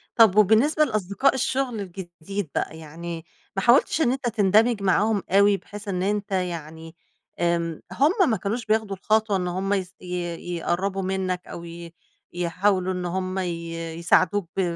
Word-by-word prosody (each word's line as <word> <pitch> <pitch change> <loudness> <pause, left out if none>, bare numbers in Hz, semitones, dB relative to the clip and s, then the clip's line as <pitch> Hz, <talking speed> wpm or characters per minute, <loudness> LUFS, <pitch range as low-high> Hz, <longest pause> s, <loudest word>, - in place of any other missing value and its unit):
طَب 220 -4 +6
وبالنسبة 230 +10 +5
لأصدقاء 215 +3 +1
الشغل 260 -3 -1
الجديد 180 -1 -6
بقى، 160 - -2
يعني 165 +1 -7 0.3
ما 195 - 0
حاولتش 255 - +4
إن 245 - +3
أنت 260 -2 -2
تندمج 215 +1 +3
معاهم 200 +2 +2
أوي 200 +1 +5
بحيث 205 +1 -11
إن 185 -1 -1
أنت 205 0 -1
يعني 165 -3 -4 0.4
آمم، 170 -2 0
هُم 325 - +3
ما 220 - +1
كانوش 225 +6 -3
بياخدوا 215 -2 0
الخطوة 215 +1 +1
إن 180 -1 -2
هُم 190 +3 -1
ي 190 -2 0 0.2
ي 175 -1 -4
يقربوا 190 +3 -1
منّك 185 -1 -2
أو 170 - -8
ي 170 0 -9 0.4
يحاولوا 185 +2 0
إن 180 -1 -4
هُم 185 +1 -2
ي 170 -2 -4 0.2
يساعدوك 180 +2 +2
ب - - +3
190 Hz, 155 wpm, -24 LUFS, 175-215 Hz, 0.4 s, طَب